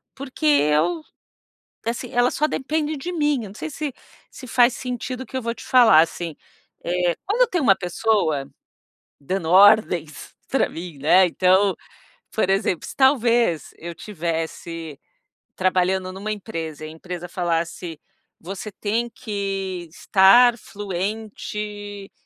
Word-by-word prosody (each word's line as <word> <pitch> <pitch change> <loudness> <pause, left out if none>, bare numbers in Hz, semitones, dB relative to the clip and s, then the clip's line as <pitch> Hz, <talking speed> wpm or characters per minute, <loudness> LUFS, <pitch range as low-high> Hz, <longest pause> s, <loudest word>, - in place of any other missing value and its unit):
porque 260 - -6
eu, 150 - +3 0.8
assim, 235 +1 -3
elas 245 +1 +2
só 300 - +2
dependem 305 +2 -2
de 345 +6 -5
mim, 295 -4 +1
não 200 -2 -8
sei, 315 - -5
se 295 -1 -4 0.4
se 255 - -11
faz 245 +1 +4
sentido, 250 +1 -5
o - - -10
que 260 - -7
eu 260 - -2
vou 230 0 -2
te - - -12
falar, 235 -10 +6
assim, 165 -1 -2 0.5
eh, 175 0 0
quando 450 +6 +2
eu - - +5
tenho 350 - -1
uma 195 - +5
pessoa, 175 -6 0 0.7
dando 170 +3 -3
ordens 185 -5 +4
pra 270 - +1
mim, 165 -3 -8
né, 180 +6 +5
então, 185 +3 +3 0.5
por 220 - 0
exemplo, 195 -3 0
se - - -8
talvez, 240 - +2
eu 170 +1 -7
tivesse 165 -4 -5 0.5
trabalhando, 185 0 0
numa 205 +3 -4
empresa 165 -7 -6
e - - -6
a - - -9
empresa 175 +2 -7
falasse, 170 -2 -3 0.4
você 195 +3 -6
tem 220 +4 -2
que 195 -5 -4
estar 230 +7 +5
fluente, 205 +1 -5
195 Hz, 140 wpm, -22 LUFS, 170-240 Hz, 0.8 s, falar